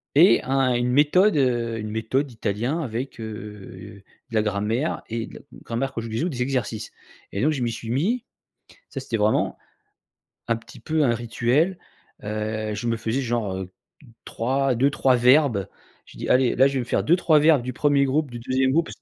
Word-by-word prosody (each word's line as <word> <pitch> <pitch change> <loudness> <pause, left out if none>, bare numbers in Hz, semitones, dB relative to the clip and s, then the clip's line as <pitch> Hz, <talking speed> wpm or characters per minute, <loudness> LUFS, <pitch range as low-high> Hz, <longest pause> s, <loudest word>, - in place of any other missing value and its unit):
Et 175 +7 +6
un 135 -1 +1
une 120 +1 0
méthode, 155 +7 +4
heu, 120 -4 +1
une 105 0 -5
méthode 110 +6 -1
d'italien 120 +6 -2
avec, 125 0 -4
heu, 105 -3 -9 0.3
de 115 - -6
la 110 - +4
grammaire 105 +7 -1
et 115 0 -4
de - - -13
la - - -9 0.2
grammaire 130 +3 -3
conjugaison, 115 +7 -2
des 125 -7 -4
exercices. 125 -4 -2 0.4
Et 100 - -3
donc, 155 +4 +2
je 135 - -3
m'y 120 - 0
suis 115 0 -7
mis, 205 - 0 0.7
ça, 135 - -5
c'était 125 -3 -3
vraiment 105 0 +1 0.9
un 115 - +2
petit 115 0 -11
peu 155 -1 0
un 125 - +3
rituel. 120 +9 0 0.5
Heu, 110 0 -3
je 120 - -4
me 115 0 +1
faisais, 115 +4 -2
genre, 115 -6 -2
heu 95 -1 -6 0.5
3 130 +2 0
2-3 135 0 +3
verbes. 125 - +4 0.4
Je - - -16
dis: - - -5
«Allez 125 -1 +3
là, 135 +2 +5
je 140 - -5
vais - - +1
me 120 - -3
faire - - 0
2-3 160 -2 +4
verbes 150 -3 +5
du 125 +1 -4
1er 140 +1 +2
groupe, 140 +1 0
du 120 - -7
2e 130 +2 +1
groupe». 165 +4 +1
125 Hz, 185 wpm, -24 LUFS, 110-140 Hz, 0.9 s, Et